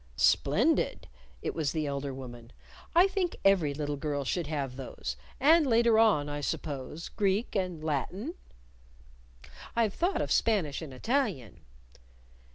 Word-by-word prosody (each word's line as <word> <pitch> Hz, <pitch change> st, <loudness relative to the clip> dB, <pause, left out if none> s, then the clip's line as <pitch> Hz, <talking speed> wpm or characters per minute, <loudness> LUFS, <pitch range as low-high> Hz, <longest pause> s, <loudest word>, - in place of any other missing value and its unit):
"Splendid!" -, -, +2 dB, 0.4 s
It -, -, -2 dB
was 155 Hz, -4 st, -1 dB
the 155 Hz, -2 st, -1 dB
elder 140 Hz, -1 st, -3 dB
woman. 120 Hz, -3 st, -9 dB, 0.4 s
"I 350 Hz, +2 st, +8 dB
think 385 Hz, -3 st, -1 dB
every 185 Hz, -7 st, +4 dB
little 145 Hz, 0 st, -3 dB
girl 145 Hz, 0 st, -2 dB
should 165 Hz, +4 st, -2 dB
have 140 Hz, -4 st, -3 dB
those. 125 Hz, -, -5 dB, 0.2 s
And 310 Hz, +2 st, +5 dB
later 230 Hz, -2 st, +4 dB
on, 205 Hz, -11 st, +4 dB
I 145 Hz, 0 st, -4 dB
suppose, 145 Hz, +1 st, -4 dB
Greek 200 Hz, +3 st, 0 dB
and 180 Hz, -5 st, -2 dB
Latin?" 180 Hz, -, -2 dB, 1.4 s
"I've 225 Hz, -4 st, +2 dB
thought 360 Hz, +4 st, 0 dB
of -, -, -5 dB
Spanish 180 Hz, -11 st, +1 dB
and 155 Hz, -4 st, -7 dB
Italian." 185 Hz, -, -1 dB
160 Hz, 135 wpm, -30 LUFS, 140-225 Hz, 1.4 s, I